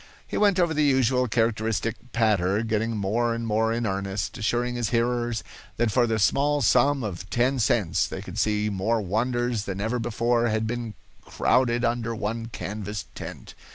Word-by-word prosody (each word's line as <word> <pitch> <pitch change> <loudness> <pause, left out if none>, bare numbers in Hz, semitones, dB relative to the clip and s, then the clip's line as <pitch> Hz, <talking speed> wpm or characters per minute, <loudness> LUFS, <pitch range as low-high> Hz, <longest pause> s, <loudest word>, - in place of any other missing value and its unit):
He - - -6
went 200 -3 +3
over 170 -2 +2
the 150 0 +2
usual 130 -2 +3
characteristic 115 -1 0 0.2
"patter," 105 -3 +2
getting 115 0 -1
more 115 +4 0
and 115 0 -4
more 110 +1 +1
in 115 +1 -1
earnest, 100 0 -2
assuring 120 +3 0
his 120 -3 -1
hearers 120 -1 0 0.3
that 120 -1 +1
for 120 +2 +3
the 110 -1 0
small 145 +7 +2
sum 140 +4 +3
of 95 -3 -5
ten 125 +3 +1
cents 105 -6 +2
they - - -6
could - - -6
see 105 0 +1
more 105 +4 0
wonders 115 +2 -1
than 100 -1 -4
ever 110 +4 -1
before 120 +1 +1
had 110 0 0
been 115 -1 -4 0.3
crowded 120 -1 +1
under 115 -1 -1
one 115 +2 -3
canvas 105 0 -5
tent. - - -8
115 Hz, 170 wpm, -25 LUFS, 105-120 Hz, 0.3 s, went